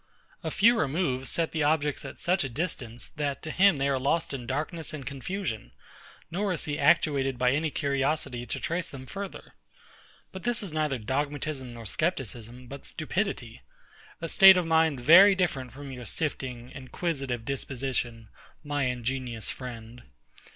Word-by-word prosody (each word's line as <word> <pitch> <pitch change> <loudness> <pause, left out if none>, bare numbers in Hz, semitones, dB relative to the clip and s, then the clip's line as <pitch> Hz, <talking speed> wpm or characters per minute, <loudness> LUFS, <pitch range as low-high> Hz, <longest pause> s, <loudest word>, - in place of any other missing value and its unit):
A - - -1
few 225 +3 +4
removes 135 -4 0
set 165 -1 0
the 160 - -1
objects 150 -1 +1
at - - -8
such 180 -1 +1
a 135 - -3
distance, 125 -5 -4
that 145 -2 -3
to 155 - -4
him 195 0 +5
they 140 0 0
are 135 -1 +1
lost 145 +4 0
in 125 -3 -5
darkness 155 +4 -3
and 140 -3 -8
confusion; 140 - -4 0.6
nor 195 +3 0
is 170 - 0
he 150 0 -3
actuated 135 -6 +3
by 125 0 +3
any 155 +4 +1
curiosity 140 -3 -1
to - - -3
trace 170 +1 -2
them 130 -2 -9
further. 195 +7 -7 0.8
But 190 - -8
this 240 0 0
is 185 -6 -4
neither 155 -3 0
dogmatism 135 +2 -3
nor 115 -1 -9
scepticism, 125 - -2
but 140 +3 -9
stupidity: 155 - -3 0.6
a 165 - -3
state 190 +3 +9
of 180 - +1
mind 160 -4 +3
very 180 +10 +8
different 140 -9 -1
from 140 0 -9
your 125 -2 -8
sifting, 130 -5 -3
inquisitive 135 -3 -3
disposition, 125 -4 -3 0.3
my 145 -2 -1
ingenious 125 -2 -2
friend. 120 -1 -8
140 Hz, 160 wpm, -28 LUFS, 125-160 Hz, 0.8 s, state